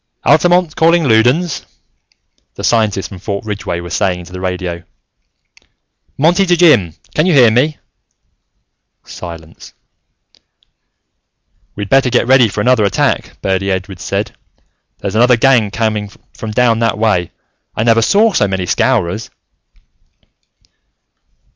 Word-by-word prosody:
"Altamont, 175 -2 +3
calling 165 +1 +3
Loudons," 125 +9 +1 0.9
the - - -8
scientist 105 -4 0
from 95 - -10
Fort 100 +2 -5
Ridgeway 100 -5 -4
was 85 - -8
saying 90 -2 0
into 90 +1 -13
the 90 - -7
radio. 90 -2 -4 1.4
"Monty 175 +7 +2
to 175 0 +2
Jim: 105 - +3 0.2
can 155 +4 +1
you 180 - +2
hear 120 -5 +6
me?" 140 +7 +1 1.3
Silence. 85 -2 -11 2.0
"We'd 100 -1 -5
better 135 -1 +3
get 120 -1 +1
ready 130 -1 +4
for 100 - -4
another 125 -3 +2
attack," 100 - -1
Birdy 95 0 -1
Edwards 95 -2 -4
said. - - -3 0.7
"There's 100 - -5
another 120 +2 +4
gang 120 -4 +3
coming 105 -1 -2 0.2
from 110 - -7
down 115 +1 +1
that 115 -3 0
way. 105 -6 0 0.5
I 110 - -1
never 115 0 +3
saw 210 - +3
so 105 - +2
many 95 -1 -3
Scowrers!" 110 0 -1
110 Hz, 125 wpm, -14 LUFS, 95-130 Hz, 2.0 s, hear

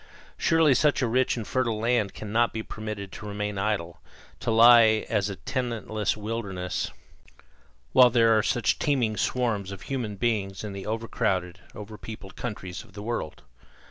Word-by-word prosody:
Surely 165 -4 +4
such 145 +1 +2
a - - +2
rich 125 +2 +1
and 115 - -4
fertile 120 -4 0
land 115 -2 0
cannot 115 +3 0
be 110 - -3
permitted 105 -3 -6
to 110 - -8
remain 105 -1 -3
idle, 95 -5 -2 0.4
to - - -3
lie 115 -1 +7
as 105 -2 +1
a 100 - -4
tenantless 110 +2 -2
wilderness, 100 -4 -3 1.0
while 125 -1 +8
there 115 -2 +4
are 110 - +4
such 120 +1 0
teeming 125 -7 +1
swarms 105 -3 -1
of 100 -2 -8
human 120 -7 -3
beings 100 -3 -1
in 105 -2 -5
the 100 0 -7
overcrowded, 105 -5 -1 0.2
over 105 0 -9
peopled 100 -3 -9
countries 95 -6 -6
of - - -20
the 105 - -8
Old - - -8
World. 115 -10 -4
110 Hz, 165 wpm, -26 LUFS, 100-120 Hz, 1.0 s, while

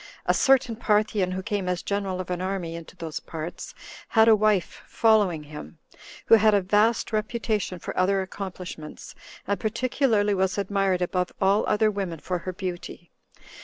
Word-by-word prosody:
A - - +3
certain 255 -4 +3
Parthian, 210 -4 +1
who 190 0 -4
came 205 -4 -2
as 180 -1 -2
general 200 -2 -2
of 185 0 -5
an 180 0 -2
army 185 -3 -3
into 170 -1 -10
those 160 -2 -5
parts, 165 +1 -7 0.3
had 220 -1 +4
a 225 - +8
wife 210 -4 +1
following 205 -9 +2
him, 150 +3 -10 0.5
who - - +4
had 215 0 +4
a 200 - +3
vast 210 +5 +2
reputation 215 -3 -1
for - - -7
other 190 +1 +2
accomplishments, 185 -5 -8 0.3
and 200 +1 -1
particularly 225 -2 +1
was 190 0 0
admired 195 -2 0
above 180 0 -1
all 195 +2 +3
other 215 0 +3
women 195 -5 -4
for 180 +3 -3
her 185 - -5
beauty. 175 -2 -7
195 Hz, 165 wpm, -25 LUFS, 180-215 Hz, 0.5 s, a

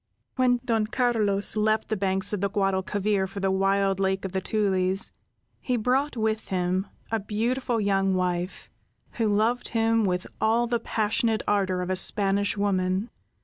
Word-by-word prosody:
When 250 -1 +3
Don 225 -4 +1
Carlos 215 -5 +1
left 215 0 +1
the 215 - 0
banks 190 +1 +1
of 205 - -2
the 200 - +1
Guadalquivir 195 0 0
for 195 +1 -7
the 195 -1 +1
wild 195 0 +1
Lake 190 0 0
of 190 - -4
the 190 0 -2
Tulies, 195 -1 0 0.5
he 250 -1 -1
brought 255 +4 0
with 220 0 -1
him 185 +1 -1 0.2
a 225 - +1
beautiful 230 +4 -1
young 195 -2 +1
wife, 180 0 -2 0.5
who 225 - +2
loved 225 +4 +1
him 225 -1 +1
with 180 -2 -1 0.2
all 225 +2 +3
the 235 0 0
passionate 220 0 0
ardor 190 -3 +1
of 180 - -3
a - - +1
Spanish 200 +2 +1
woman. 190 +1 0
205 Hz, 160 wpm, -26 LUFS, 190-225 Hz, 0.5 s, When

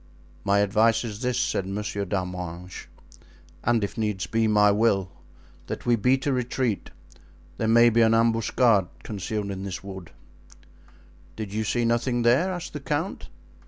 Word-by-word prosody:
"My 100 +1 +3
advice 110 +3 +3
is 105 -3 -6
this," 125 -1 0
said 100 -6 -1
Monsieur 100 0 -3
d'Arminges, 90 -1 -5 0.8
"and 115 -2 +2
if 100 - -3
needs 105 -4 -1
be, 115 0 +1
my 105 -1 +5
will, 100 -4 +1 0.6
that - - -6
we 120 -1 +4
beat 125 +5 +1
a 140 - +1
retreat. 125 -3 -1 0.7
There 110 - 0
may 115 +1 +6
be 115 +1 +3
an 115 0 +5
ambuscade 115 -3 +3 0.2
concealed 105 0 -4
in 95 -1 -5
this 95 -1 -5
wood." 95 -3 -8 1.3
"Did 105 -3 -6
you 110 +1 -1
see 120 +3 0
nothing 120 +1 +1
there?" 130 +11 +3
asked 175 -1 -6
the 150 - -4
count. 150 +6 -3
110 Hz, 155 wpm, -25 LUFS, 100-120 Hz, 1.3 s, may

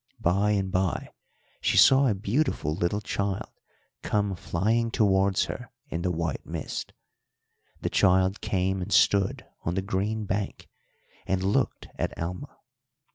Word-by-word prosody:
By 100 +4 +2
and 95 -2 0
by 95 -2 0 0.5
she - - +2
saw 135 +1 +7
a 110 - +2
beautiful 100 - 0
little 85 +6 -1
child 100 -1 -2 0.5
come 100 -2 0
flying 110 +8 0
towards 100 -3 +2
her 125 -2 -7 0.2
in 85 - -3
the 90 - 0
white 85 -3 -2
mist. - - -5 0.9
The - - -1
child 95 +2 +3
came 95 0 0
and 95 +3 -5
stood 100 -1 +3 0.2
on 85 - -2
the 95 - -1
green 105 +3 -1
bank 100 +1 -3 0.6
and 95 0 0
looked 100 +2 0
at - - -2
Alma. 90 - -5
95 Hz, 135 wpm, -27 LUFS, 90-105 Hz, 0.9 s, saw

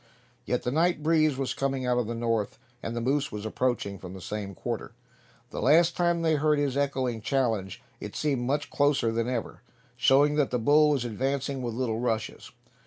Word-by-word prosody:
Yes, - - -1
the 125 - -1
night 165 +2 +1
breeze 155 -3 +3
was 135 -1 -1
coming 135 -1 -2
out 125 0 +2
of 120 - -1
the 115 - -3
north, 115 -2 -1 0.2
and 115 - -4
the 120 - -2
moose 140 +4 0
was 105 0 -6
approaching 110 -4 -1
from 90 0 -9
the - - -8
same 100 +1 -5
quarter. - - -5 0.6
The - - -4
last 170 +2 +4
time 170 -1 +1
they 160 -2 +3
heard 150 0 +2
his 140 -2 0
echoing 130 -5 -1
challenge 110 -7 -1 0.2
it - - -7
seemed 140 -5 0
much 135 +4 -1
closer 145 -5 +2
than 115 +1 -1
ever, 120 -4 -4 0.3
showing 145 +2 +4
that 145 -3 +2
the 125 - 0
bull 150 +6 +4
was 140 -5 +1
advancing 135 +4 -2
with 120 -2 -3
little 115 -3 -1
rushes. 115 -2 -2
130 Hz, 195 wpm, -27 LUFS, 115-145 Hz, 0.6 s, last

